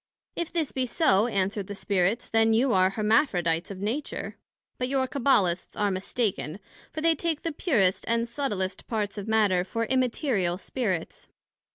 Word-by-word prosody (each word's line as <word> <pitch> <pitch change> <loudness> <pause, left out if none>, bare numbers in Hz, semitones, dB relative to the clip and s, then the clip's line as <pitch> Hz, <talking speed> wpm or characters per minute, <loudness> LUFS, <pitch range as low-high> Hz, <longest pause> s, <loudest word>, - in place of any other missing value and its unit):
If 340 - -3
this 325 -4 -1
be 260 -1 -1
so, 235 - +3
answered 200 -2 -1
the 205 - -6
Spirits, 200 +3 0
then 225 0 +3
you 245 +3 +3
are 185 0 +4
Hermaphrodites 195 - +1
of 200 - -6
Nature; 225 +10 -3 0.4
but 250 - 0
your 265 -1 +1
Cabbalists 215 -12 +1
are 205 -1 +2
mistaken, 190 -3 -2 0.3
for 310 - -5
they 330 +1 +4
take 320 -1 -2
the 330 - -1
purest 230 - +1
and 230 +1 +1
subtilest 220 -7 -3
parts 210 -2 -2
of 200 - -7
Matter, 210 -5 +3
for 230 +5 -2
Immaterial 240 - 0
Spirits. 190 -5 -3
220 Hz, 160 wpm, -27 LUFS, 190-260 Hz, 0.4 s, are